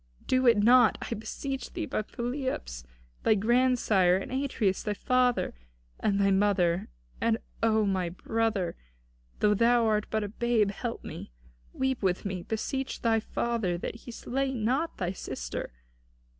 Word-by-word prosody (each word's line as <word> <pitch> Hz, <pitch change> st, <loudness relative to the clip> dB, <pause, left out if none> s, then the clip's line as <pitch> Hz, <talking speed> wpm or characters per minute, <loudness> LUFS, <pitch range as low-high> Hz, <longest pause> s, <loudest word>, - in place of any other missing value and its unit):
Do 255 Hz, 0 st, +2 dB
it 230 Hz, -3 st, +6 dB
not, 240 Hz, +4 st, +6 dB
I -, -, +2 dB
beseech 260 Hz, +4 st, -5 dB
thee, -, -, -3 dB
by -, -, -1 dB
Pelops 240 Hz, -, -4 dB, 0.4 s
thy 220 Hz, -, +4 dB
grandsire, 220 Hz, -4 st, +3 dB
and 195 Hz, -, -6 dB
Atreus 255 Hz, -8 st, 0 dB
thy 210 Hz, -1 st, -2 dB
father, 250 Hz, +2 st, +1 dB, 0.5 s
and 205 Hz, -, +1 dB
this 200 Hz, -, +2 dB
my 195 Hz, -, +4 dB
mother. 190 Hz, -3 st, +2 dB, 0.3 s
And 230 Hz, -1 st, +2 dB, 0.2 s
thou, 220 Hz, -1 st, +3 dB
O -, -, +2 dB
my 190 Hz, -3 st, 0 dB
brother, 215 Hz, 0 st, -1 dB, 0.7 s
though 210 Hz, 0 st, +5 dB
thou 235 Hz, +2 st, +4 dB
art 215 Hz, -1 st, +1 dB
but 220 Hz, -1 st, 0 dB
a -, -, -2 dB
babe, 220 Hz, -1 st, +1 dB
help 230 Hz, +3 st, -5 dB
me. -, -, -8 dB, 0.4 s
Weep 265 Hz, -1 st, -1 dB
with 185 Hz, -1 st, 0 dB
me; 190 Hz, -2 st, -3 dB
beseech 260 Hz, +7 st, -3 dB
thy 225 Hz, -1 st, +3 dB
father 220 Hz, -5 st, -1 dB
that -, -, -4 dB
he 235 Hz, +2 st, -10 dB
slay 265 Hz, +3 st, -2 dB
not 255 Hz, +9 st, 0 dB
thy 180 Hz, -2 st, -1 dB
sister. -, -, -5 dB
220 Hz, 155 wpm, -29 LUFS, 195-245 Hz, 0.7 s, it